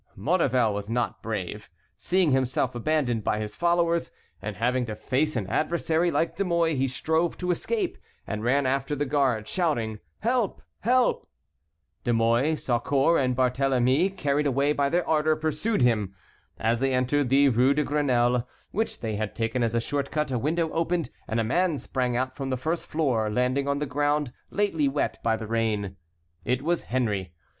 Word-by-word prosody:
Maurevel 130 - +2
was 100 +1 -5
not 120 +1 -1
brave. 105 -1 -5 0.3
Seeing 180 -4 +2
himself 130 -1 +1
abandoned 120 -3 0
by 105 - 0
his 105 -1 -5
followers, 170 -1 +1 0.3
and 100 +1 -5
having 125 +4 +1
to 110 - -4
face 135 +7 0
an 110 -5 -1
adversary 165 - +1
like 165 - 0
De - - 0
Mouy, 170 -3 +1
he 135 -1 +1
strove 160 +5 0
to 180 0 -1
escape, 395 - -2 0.3
and 110 -1 -4
ran 135 +4 +2
after 135 +2 0
the 145 +1 -1
guard, 130 -6 +1
shouting, 120 - -1 0.2
"help! 235 -2 0 0.2
help!" 250 +3 +2 0.7
De 120 - 0
Mouy, 115 +7 +2
Saucourt, 140 +4 +2
and 125 -1 +1
Barthélemy, 130 +5 +2
carried 145 0 +1
away 140 +2 +2
by 140 -1 +1
their 175 +2 0
ardor, 155 0 +2
pursued 155 - 0
him. 105 -6 +1 0.4
As 115 +1 +1
they 135 0 +1
entered 130 +1 +1
the 140 +1 +5
Rue 130 +3 +3
de 150 - +2
Grenelle, 125 -5 +1 0.2
which 220 +3 -2
they 110 -3 -2
had 105 -2 -3
taken 115 +2 -1
as 115 0 0
a - - +3
short 140 +4 -2
cut, 150 -2 -1
a 125 - 0
window 160 +5 0
opened 165 0 -1 0.2
and 115 +1 -1
a - - +2
man 170 +7 +1
sprang 125 -3 -1
out 130 +1 -2
from 135 -1 -4
the 130 - -1
first 160 +6 -2
floor, 130 -9 0
landing 125 +5 0
on 140 0 +1
the 150 - -1
ground 145 -1 0 0.2
lately 195 -8 +1
wet 140 +2 -1
by 115 -1 +1
the 110 - -6
rain. 110 -3 -1 0.5
It 125 +2 -1
was 170 +2 0
Henry. 105 -8 -1
135 Hz, 180 wpm, -26 LUFS, 120-155 Hz, 0.7 s, the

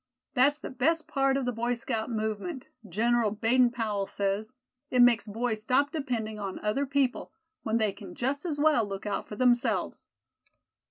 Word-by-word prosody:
That's 280 +3 +4
the - - -7
best 315 +5 +1
part 275 -3 +2
of 270 - -1
the 245 - 0
Boy 240 +1 -1
Scout 230 -1 -3
movement, 220 - -3 0.2
General 230 +4 +2
Baden 235 +4 +3
Powell 215 -5 -2
says; 200 +4 -2 0.3
it 250 - +1
makes 245 -2 +5
boys 220 +1 -2
stop 275 +6 +2
depending 235 -8 -3
on 195 -2 -4
other 270 +7 0
people, 270 -2 0 0.3
when 220 +1 0
they 215 -3 +1
can 190 -2 -11
just 270 +4 -1
as 320 -5 -2
well 295 -5 +4
look 195 -1 -6
out 205 -1 -2
for 210 - -7
themselves." 245 +1 +1
240 Hz, 170 wpm, -28 LUFS, 215-270 Hz, 0.3 s, makes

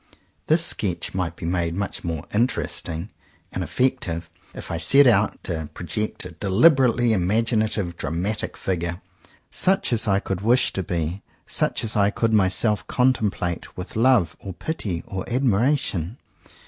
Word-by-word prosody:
This 165 +2 +4
sketch 95 -5 -1
might 90 -3 -2
be - - -7
made 85 -1 -1
much 100 +1 -3
more 80 -4 -3
interesting 105 -6 -1 0.4
and - - -3
effective, 90 -11 -1 0.2
if - - -7
I 85 - -1
set 135 +13 +6
out 110 -4 +3
to 80 -4 -3
project 95 +4 -3
a 90 - -7
deliberately 120 - +3
imaginative 105 -2 0
dramatic 95 +8 -3
figure, 85 -1 -2 0.5
such 190 -8 +1
as 115 -1 +1
I 95 -1 +3
could 95 -2 -4
wish 120 +4 +3
to 95 - -1
be, 85 0 -3 0.2
such - - 0
as 115 0 -1
I 100 -1 +4
could 115 +1 0
myself 100 0 +2
contemplate 110 -9 0
with 90 - -7
love 115 -7 +3
or 95 - -7
pity 95 - -4
or 95 -1 -5
admiration. 120 - +1
100 Hz, 145 wpm, -23 LUFS, 85-115 Hz, 0.5 s, set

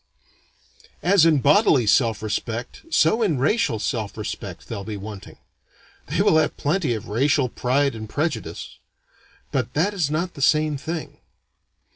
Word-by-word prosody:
As 180 -2 +5
in 155 -4 +3
bodily 145 - +4
self 110 0 +2
respect, 115 - -4
so 220 - +3
in 185 -10 +1
racial 140 - +1
self 110 -1 -3
respect, - - -6
they'll 100 - -5
be 105 0 -5
wanting. 100 0 -9 0.7
They - - +1
will 160 - +4
have 155 -1 +1
plenty 150 -5 0
of 110 +1 -7
racial 135 +4 +1
pride 135 +4 0
and 110 -1 -8
prejudice, 155 +4 -4 0.7
but 125 -2 -2
that 185 +8 +1
is 175 -8 0
not 170 +4 -2
the 140 - -9
same 155 +1 +3
thing. 160 +3 -6
140 Hz, 145 wpm, -23 LUFS, 115-160 Hz, 0.7 s, As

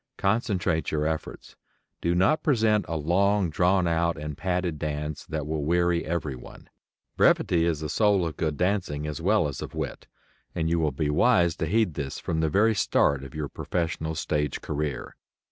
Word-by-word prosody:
Concentrate 95 -5 0
your 75 -1 -1
efforts. 80 0 -4 0.5
Do 85 +1 +1
not 95 - +3
present 110 -7 +2
a 80 0 -2
long 95 +4 +2
drawn 90 +3 +2
out 85 0 +1
and 75 -1 -5
padded 90 -3 -2
dance 75 0 -4
that 75 -2 -3
will 75 -1 -2
weary 85 +2 +2
everyone. 75 -6 -5 0.5
Brevity 85 -1 +3
is 80 -3 0
the 75 - -3
soul 100 +1 +2
of 80 - -4
good 75 -3 -2
dancing 90 -6 -1
as 75 -2 -5
well 75 - +3
as 70 - -6
of - - -7
wit, - - -5 0.5
and 80 0 0
you 85 - +2
will 80 -2 +2
be 75 +2 -1
wise 85 -2 +3
to - - -2
heed 110 -6 +2
this 70 -2 -4
from 80 - -2
the 80 -1 +1
very 110 +8 +3
start 70 -8 +2
of 70 +1 -10
your 75 -1 -3
professional 80 0 -3
stage 75 -2 -1
career. 75 -2 -4
80 Hz, 180 wpm, -26 LUFS, 75-90 Hz, 0.5 s, not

